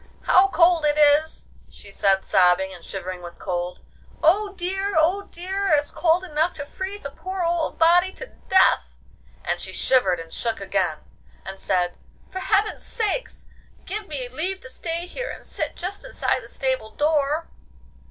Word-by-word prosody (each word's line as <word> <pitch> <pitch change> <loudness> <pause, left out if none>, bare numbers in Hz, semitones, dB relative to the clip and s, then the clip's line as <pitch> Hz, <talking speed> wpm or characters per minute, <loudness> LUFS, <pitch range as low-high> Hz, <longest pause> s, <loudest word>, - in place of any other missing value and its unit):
How 375 +2 +5
cold 340 -2 +4
it 295 0 +2
is!' 300 +1 +4 0.2
she 200 - -10
said, 195 -1 +2
sobbing, 190 0 +3
and 175 -2 -12
shivering 185 -1 -6
with 175 0 -10
cold. 175 -1 -4 0.4
'Oh 395 +5 +3
dear! 385 +2 -2
oh 360 +6 +2
dear! 385 +3 -2
it's 290 0 0
cold 345 +1 +2
enough 320 0 0
to 285 - -6
freeze 380 +4 -6
a 280 - -4
poor 370 +4 -5
old 335 -1 -1
body 350 +3 +5
to - - -8 0.2
death!' 380 0 +3 0.5
and - - -1
she - - -2
shivered 190 -10 +2
and 165 0 -10
shook 230 -2 -2
again, 190 -5 -1 0.4
and 190 0 -7
said, 180 -2 0 0.3
'For 375 - -4
heaven's 410 +2 +1
sake 460 +2 -1 0.6
give 415 +1 -4
me 270 -5 -3
leave 335 +10 -2
to 260 - -10
stay 335 +3 -3
here - - -5
and - - -8
sit - - -3
just 375 +3 -4
inside - - -1
the - - -12
stable 260 -5 -2
door. 300 +1 +1
315 Hz, 165 wpm, -23 LUFS, -, 0.6 s, How